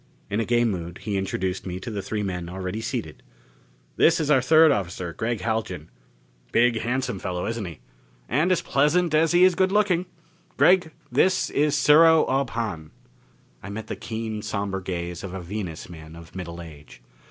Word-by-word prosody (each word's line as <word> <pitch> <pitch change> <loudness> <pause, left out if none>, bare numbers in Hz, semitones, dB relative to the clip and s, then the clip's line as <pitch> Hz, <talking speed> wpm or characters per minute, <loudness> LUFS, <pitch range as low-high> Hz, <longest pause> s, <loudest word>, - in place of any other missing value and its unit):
In 105 - 0
a 115 - 0
gay 120 +1 +2
mood, 85 -5 -3
he 105 -2 -2
introduced 95 -1 -2
me 90 0 -4
to 115 - -6
the 100 -2 -3
three 105 +1 -3
men 90 -3 -4
already 95 +4 -4
seated: 115 - -4 0.8
"This 170 +1 +4
is 150 -2 0
our 135 -3 +5
third 160 +4 +6
officer, 90 - -2
Gregg 115 +3 -2
Haljan. 95 -7 -3 0.6
Big, 120 -1 +3
handsome 125 -2 -2
fellow, 90 -2 -3
isn't 115 -2 -3
he? 85 -4 -9 0.5
And 155 +7 +1
as 185 - +1
pleasant 155 +4 +2
as 160 +1 +3
he 175 +1 +5
is 185 0 +6
good 190 +2 +2
looking. 190 -4 +2 0.5
Gregg, 180 -2 +5 0.2
this 185 0 +2
is 150 0 +2
Sero 160 +2 +6
Ob 135 -1 0
Hahn." 105 -10 -4 0.7
I 100 - -8
met 110 +2 -6
the - - -5
keen, 110 -1 -5
somber 100 -2 -3
gaze 85 -1 -5
of 95 -1 -6
a - - -4
Venus 90 -2 -6
man 80 -2 -11
of 85 +1 -13
middle 85 -2 -6
age. 75 -6 -13
110 Hz, 180 wpm, -24 LUFS, 90-145 Hz, 0.8 s, third